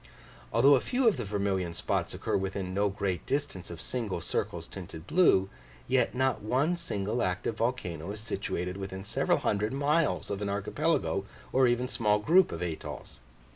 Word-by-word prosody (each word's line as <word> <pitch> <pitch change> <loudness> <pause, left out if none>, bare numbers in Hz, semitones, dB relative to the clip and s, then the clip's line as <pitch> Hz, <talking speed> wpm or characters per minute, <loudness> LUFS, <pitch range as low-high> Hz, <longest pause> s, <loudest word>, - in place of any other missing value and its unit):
Although 135 +5 +6
a 130 - +5
few 250 -1 +1
of 215 - +4
the 120 - -3
vermilion 95 -4 -1
spots - - -1
occur - - -1
within 95 -1 -2
no 100 +1 +2
great 95 -3 -2
distance 140 -11 -2
of 85 -1 -7
single 115 -3 -3
circles 85 -1 -3
tinted 85 -4 -9
blue, 105 - +4 0.4
yet - - +2
not 130 -1 +1
one 130 +11 +1
single 115 - -2
active 95 +4 -1
volcano 100 -9 -2
is 105 - -6
situated 95 -4 -3
within 95 -1 -5
several 100 - +1
hundred 105 +3 0
miles 145 +1 +1
of 100 0 -3
an 100 - -1
archipelago, 100 +1 0 0.3
or 130 0 +5
even 120 +1 +1
small 105 -4 +2
group 170 - +4
of - - -4
atolls. 85 -3 -6
105 Hz, 170 wpm, -30 LUFS, 95-130 Hz, 0.4 s, Although